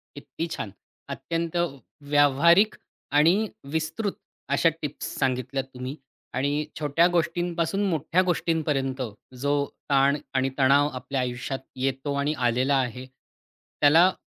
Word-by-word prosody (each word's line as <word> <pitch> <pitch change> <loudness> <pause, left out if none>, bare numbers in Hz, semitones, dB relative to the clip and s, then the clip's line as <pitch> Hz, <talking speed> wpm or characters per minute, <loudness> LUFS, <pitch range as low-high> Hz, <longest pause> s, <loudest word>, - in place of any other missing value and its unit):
किती 165 - -5
छान! 105 - -4 0.4
अत्यंत 165 0 -3 0.5
व्यावहारिक 160 +8 +5 0.4
आणि 165 +5 +6 0.4
विस्तृत 160 +6 -1 0.4
अशा 165 - +4
टिप्स 145 - -4
सांगितल्यात 130 +1 -1
तुम्ही 130 +3 -5 0.4
आणि 145 +3 0 0.2
छोट्या 155 +3 +3
गोष्टींपासून 175 +2 0
मोठ्या 165 +2 +1
गोष्टींपर्यंत, 150 -7 0 0.3
जो 140 +3 -1 0.4
ताण 140 +1 +4 0.2
आणि 130 0 +1
तणाव 140 +2 +5
आपल्या 130 +1 -3
आयुष्यात 125 +2 -3 0.2
येतो 135 +2 -1
आणि 140 +2 0
आलेला 130 +4 +2
आहे, 130 0 -2
त्याला 150 +6 +1
145 Hz, 110 wpm, -26 LUFS, 130-165 Hz, 0.5 s, आणि